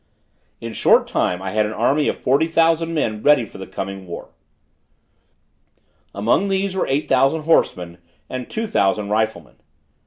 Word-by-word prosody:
In 115 - -6
a - - -10
short - - +4
time 90 +1 -1
I 95 - -4
had 105 +1 +1
an 110 - -5
army 135 +7 +1
of - - -1
forty 140 +5 +1
thousand 165 0 +1
men 110 -8 -1
ready 145 -3 +4
for 100 - -13
the 95 - -8
coming 95 0 -6
war: 85 - -8 1.8
among 115 - +1
these 195 0 -1
were 190 - -1
eight 140 +3 -1
thousand 135 +4 +2
horsemen 90 - +1 0.3
and 130 -1 -6
two 225 - -3
thousand 100 - 0
riflemen. 110 -7 -2
115 Hz, 160 wpm, -20 LUFS, 100-160 Hz, 1.8 s, short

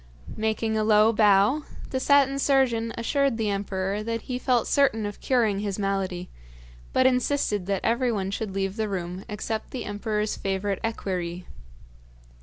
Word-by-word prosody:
Making 220 0 -1
a 215 - +1
low 215 +1 +5
bow, 210 +6 +4 0.3
the 260 - 0
Satin 275 0 +3
Surgeon 255 -5 +2
assured 275 +1 +1
the 215 -2 0
emperor 195 0 -2
that 230 +1 -3
he 250 -1 -4
felt 250 -2 +2
certain 240 -7 +2
of 205 0 -6
curing 225 -6 +2
his 200 -2 -3
malady, 195 -3 -2 0.6
but 260 - +3
insisted 250 -6 +1
that 200 -1 -1
everyone 230 -5 0
should 200 -1 -4
leave 195 +1 -2
the 220 -1 -1
room 180 -1 -4
except 215 +1 -4
the 255 - -5
emperor's 210 +1 -2
favourite 195 0 -2
equerry. 180 -5 -3
215 Hz, 150 wpm, -26 LUFS, 195-235 Hz, 0.6 s, low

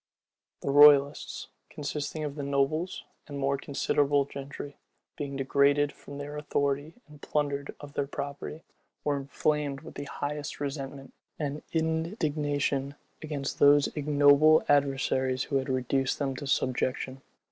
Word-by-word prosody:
The 140 - 0
royalists, 145 0 +5 0.2
consisting 150 +1 -4
of 145 -2 -3
the 145 - -6
nobles 140 +5 0 0.2
and 145 - -6
more 140 0 +1
considerable 140 0 +1
gentry, 140 +1 -8 0.4
being 140 -1 -5
degraded 140 +2 +3
from 140 - -11
their 145 +1 -6
authority 145 +1 -1
and 150 -1 -16
plundered 145 -1 -2
of 145 -1 -10
their 140 -1 -1
property, 145 +3 -6 0.4
were 145 -1 +1
inflamed 140 0 -1
with - - -11
the 145 - -6
highest 150 +1 -4
resentment 140 -1 -5 0.2
and 145 -1 -3
indignation 150 - -1 0.3
against 145 -3 -4
those 145 0 +6
ignoble 150 +1 +5
adversaries 135 -2 +2
who 140 - 0
had 135 0 -2
reduced 130 +1 0
them 135 -2 -2
to 145 - -6
subjection. 130 0 -1
145 Hz, 130 wpm, -29 LUFS, 140-150 Hz, 0.4 s, those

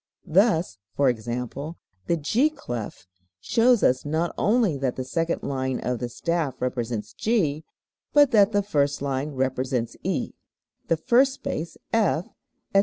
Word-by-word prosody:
Thus, 175 - +2 0.2
e.g., 125 -5 +3 0.9
the 170 - +2
G 230 - +2
clef 120 - -6 0.3
shows 235 - +3
us 130 +1 +3
not 160 +3 -1
only 215 -6 +2
that 130 -2 -1
the 130 - -3
second 165 +6 -1
line 130 -2 -2
of 125 0 -2
the 120 - -3
staff 155 0 -2
represents 120 -3 -3
G, 165 -10 0 0.5
but 290 -2 +5
that 210 -3 +5
the 205 -1 +2
first 145 -8 0
line 140 +1 -1
represents 130 -2 -1
E, - - -2 0.5
the 165 - +2
first 260 - +3
space 165 - -5 0.2
F, 200 -6 +2 0.5
etc. 195 - +6
155 Hz, 140 wpm, -25 LUFS, 130-205 Hz, 0.9 s, etc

